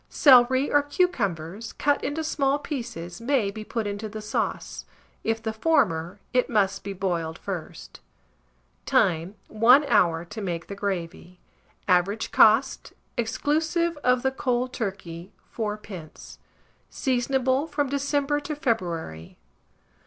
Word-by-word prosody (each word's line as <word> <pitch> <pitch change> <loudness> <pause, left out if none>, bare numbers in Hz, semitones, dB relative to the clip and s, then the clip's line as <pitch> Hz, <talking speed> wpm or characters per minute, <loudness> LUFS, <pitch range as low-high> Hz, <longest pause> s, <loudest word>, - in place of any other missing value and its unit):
Celery 260 0 +5
or 290 - +5
cucumbers, 225 - -1
cut 290 0 +1
into 315 +2 -2
small 280 -2 +1
pieces, 230 - -6
may 235 -5 +1
be 215 +1 -7
put 225 0 -3
into 205 +1 -4
the 215 +1 -7
sauce; 210 0 -3 0.4
if 225 0 -1
the 220 -1 -2
former, 210 - +1
it 250 0 +2
must 195 -3 +1
be 200 - -5
boiled 175 -4 -2
first. 165 - -7 0.9
Time. 170 +3 +2
1 245 +7 +5
hour 170 -10 +2
to 205 +5 -8
make 170 -4 -3
the - - -7
gravy. 180 -2 -5 0.5
Average 190 +4 +1
cost, 225 +5 +4 0.2
exclusive 315 +8 0
of 250 -3 +1
the 265 - +2
cold 250 -1 -1
turkey, 190 -5 -5 0.2
4d. 210 -7 -6 0.5
Seasonable 260 +2 0
from 290 -3 -1
December 285 +1 0
to 295 +1 -5
February. 175 - -3
225 Hz, 125 wpm, -25 LUFS, 185-270 Hz, 0.9 s, Celery